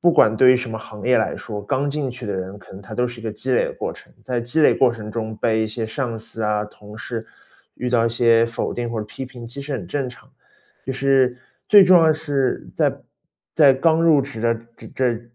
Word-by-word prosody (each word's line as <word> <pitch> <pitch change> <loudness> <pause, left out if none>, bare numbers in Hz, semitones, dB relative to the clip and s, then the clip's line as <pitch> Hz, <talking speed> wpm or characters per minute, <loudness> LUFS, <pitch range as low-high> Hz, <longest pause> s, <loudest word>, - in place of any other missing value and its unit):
不 175 0 +5
管 110 -7 +4
对 130 +2 +7
于 - - +3
什 125 -1 -4
么 110 - -4
行 110 0 -9
业 125 - +4
来 - - -1
说， 105 -2 -6
刚 135 +7 -1
进 140 -2 -2
去 125 -2 -8
的 100 - -2
人 95 +2 -5
可 95 - -16
能 95 - -10
他 - - -9
都 125 0 +2
是 120 -1 -9
一 - - -12
个 110 - -2
积 125 +5 -3
累 - - +3
的 - - -5
过 - - -4
程。 - - -17
在 125 -2 -1
积 120 +7 -1
累 - - +6
过 130 -2 +4
程 105 -2 -8
中 110 0 -4
被 110 0 +1
一 110 - -2
些 110 0 -4
上 115 -1 -3
司 110 0 -7
啊， 105 0 0
同 105 0 -13
事 115 -2 -5 0.5
遇 125 - -3
到 120 -2 +2
一 - - +2
些 115 0 +4
否 115 +1 -3
定 120 -1 -3
或 115 - -3
批 110 +5 -7
评， 120 -2 -10
其 125 +4 -9
实 145 0 -6
很 100 -10 -4
正 135 +5 -2
常。 120 - -15 0.6
就 130 - -3
是 135 -2 +2 0.3
最 205 -2 +9
重 185 0 +7
要 160 -1 +5
的 155 - +4
是 140 -5 -2
在 - - +1 0.5
在 145 -4 +7
刚 160 +4 +2
入 155 -4 +5
职 135 -5 -7
的 115 0 +2 0.2
这 - - -12
这 120 -3 -1
120 Hz, 275 characters per minute, -21 LUFS, 110-135 Hz, 0.6 s, 最